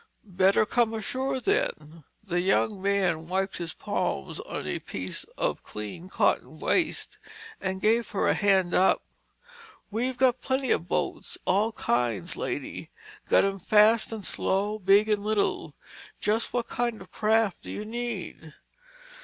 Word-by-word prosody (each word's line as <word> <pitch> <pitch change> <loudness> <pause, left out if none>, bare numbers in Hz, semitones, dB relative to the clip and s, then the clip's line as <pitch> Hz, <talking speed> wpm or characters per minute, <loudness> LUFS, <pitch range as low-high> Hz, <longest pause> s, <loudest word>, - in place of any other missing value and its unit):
"Better 190 +3 +4
come 230 0 +1
ashore, 260 +5 -2
then." 395 - -1 0.2
The 175 -3 -1 0.3
man 190 -5 0
wiped 190 +2 -1
his 170 -2 -4
palms 70 - -2
on - - -5
a - - -2
piece 95 -1 -6
of - - -1
clean 105 - -7
cotton - - +1
waste - - 0 0.4
and 190 0 -3
gave 230 +2 +3
her 200 - 0
a - - +4
hand 190 -4 +2
up. 190 - +4 0.9
"We've 245 +4 -1
got 255 -1 +3
plenty 265 -1 0
of 170 - +1
boats—all 205 +4 -1
kinds, 120 - 0
lady. - - -4 0.4
Got - - +5
'em 195 0 -2
fast 215 +4 +4
and 220 -3 -5
slow, 205 +3 0
big 200 +2 +5
and 210 -2 +1
little. 215 -1 0 0.4
Just 220 +2 +1
what 240 -1 -1
kind 240 -1 -1
of - - -13
a - - -18
craft 220 -2 +1
do - - -9
you 210 - -5
need?" 220 -9 -5
205 Hz, 145 wpm, -27 LUFS, 185-230 Hz, 0.9 s, Got